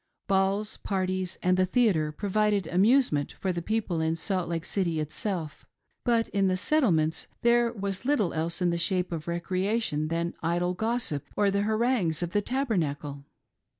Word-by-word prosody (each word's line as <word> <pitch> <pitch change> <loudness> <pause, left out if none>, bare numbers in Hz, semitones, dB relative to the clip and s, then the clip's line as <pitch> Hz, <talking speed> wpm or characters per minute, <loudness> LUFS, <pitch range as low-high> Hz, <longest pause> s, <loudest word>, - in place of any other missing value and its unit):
Balls, 195 +2 +1
parties, 185 -2 -2
and 180 0 +3
the 185 0 +3
tiieatre 180 -10 +2
provided 205 -1 +1
amusement 190 - +3
for 190 - -2
the 175 -1 -3
people 200 -4 -1
in 160 0 +1
Salt 180 0 -2
Lake 165 -1 -2
City 170 -5 -1
itself; 155 +1 -4 0.4
Ijut 230 -1 +3
in 195 -1 +1
the 185 0 +1
Settlements 180 - +1 0.2
there 235 0 +4
was 200 -3 -4
little 250 -9 +1
else 165 +3 -2
in 175 - +3
the 170 - -1
shape 180 +1 0
of 160 -2 -5
recreation 185 -1 -1
than 170 +1 -1
idle 175 +2 0
gossip 220 - -2
or 205 -1 +3
the 200 +1 +1
harangues 215 -6 +1
of 170 - -3
the 205 - +2
Tabernacle. 155 - -2
185 Hz, 160 wpm, -28 LUFS, 170-215 Hz, 0.4 s, there